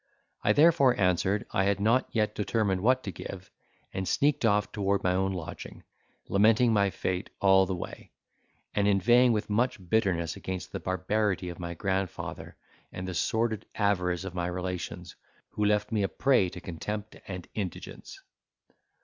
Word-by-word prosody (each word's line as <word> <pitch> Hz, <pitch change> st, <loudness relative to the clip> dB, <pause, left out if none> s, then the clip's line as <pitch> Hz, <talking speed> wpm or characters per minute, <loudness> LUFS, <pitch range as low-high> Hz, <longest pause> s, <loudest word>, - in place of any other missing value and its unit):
I -, -, +4 dB
therefore 140 Hz, -5 st, +5 dB
answered, 95 Hz, +4 st, +1 dB
I 95 Hz, -, +1 dB
had 100 Hz, 0 st, +1 dB
not 115 Hz, +5 st, +2 dB
yet 105 Hz, -2 st, 0 dB
determined 105 Hz, -2 st, 0 dB
what 130 Hz, +4 st, +3 dB
to 100 Hz, -, -4 dB
give; 95 Hz, +2 st, -9 dB, 0.4 s
and 95 Hz, -1 st, -3 dB
sneaked 140 Hz, -, +2 dB
off 105 Hz, -1 st, +2 dB
toward 100 Hz, -1 st, 0 dB
my 90 Hz, -, +2 dB
own 95 Hz, +1 st, +1 dB
lodging, 90 Hz, -4 st, -7 dB, 0.4 s
lamenting 110 Hz, +4 st, +4 dB
my 100 Hz, -2 st, +3 dB
fate 95 Hz, +1 st, -3 dB
all 95 Hz, -1 st, +5 dB
the 95 Hz, -, -2 dB
way, 85 Hz, -, -8 dB, 0.6 s
and 100 Hz, -1 st, +2 dB
inveighing 120 Hz, +6 st, +5 dB
with 105 Hz, -1 st, -1 dB
much 120 Hz, +5 st, +1 dB
bitterness 95 Hz, -7 st, +1 dB
against 95 Hz, -1 st, -6 dB
the -, -, -4 dB
barbarity 95 Hz, 0 st, -1 dB
of 85 Hz, -, -8 dB
my 85 Hz, -1 st, -5 dB
grandfather, 95 Hz, +1 st, -3 dB, 0.4 s
and 90 Hz, 0 st, -6 dB
the 90 Hz, -, -4 dB
sordid 110 Hz, +5 st, -1 dB
avarice 90 Hz, -4 st, +1 dB
of 95 Hz, -2 st, -6 dB
my 85 Hz, -1 st, -2 dB
relations, 90 Hz, -1 st, -5 dB, 0.4 s
who 105 Hz, -, -2 dB
left 105 Hz, +1 st, +1 dB
me 110 Hz, -2 st, +1 dB
a 100 Hz, -, +2 dB
prey 125 Hz, -9 st, +2 dB
to 90 Hz, -, -9 dB
contempt 105 Hz, +5 st, -6 dB
and 90 Hz, -3 st, -6 dB
indigence. 95 Hz, -5 st, -6 dB
100 Hz, 160 wpm, -28 LUFS, 90-110 Hz, 0.6 s, therefore